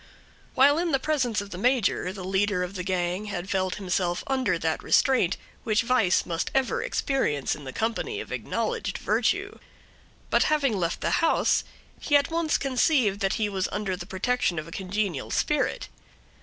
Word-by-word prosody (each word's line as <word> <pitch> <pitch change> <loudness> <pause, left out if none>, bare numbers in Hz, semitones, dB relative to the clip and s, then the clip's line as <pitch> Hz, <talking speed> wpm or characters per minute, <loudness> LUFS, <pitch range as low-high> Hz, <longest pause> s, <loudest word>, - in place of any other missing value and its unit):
While 285 +4 +5
in 340 -3 -1
the 270 - +3
presence 260 -8 0
of 200 0 -10
the 180 - -6
major 240 -6 +1
the 190 -1 -8
leader 190 0 +1
of 180 +1 -5
the 185 - -4
gang 180 +2 -1
had 195 -2 -5
felt 185 -1 0
himself 180 -2 -1
under 265 -1 0
that - - -1
restraint 255 -10 +3 0.3
which 220 +1 +2
vice 230 -6 +2
must 170 -2 -2
ever 270 - +1
experience 270 - 0
in 145 - -8
the 130 - -5
company 230 - -2
of - - -8
acknowledged - - -2
virtue; - - 0 0.7
but - - +4
having 280 -7 +2
left 170 -3 -2
the - - 0
house, 330 - +3 0.4
he 290 - +1
at 285 +2 +3
once 330 -1 +1
conceived 255 -6 +2
that 195 -1 +1
he 215 -2 0
was 195 -2 -2
under 200 -2 -2
the - - -8
protection 190 -2 0
of 155 +1 -4
a - - -11
congenial 190 -5 -2
spirit. - - 0
205 Hz, 175 wpm, -26 LUFS, 185-265 Hz, 0.7 s, While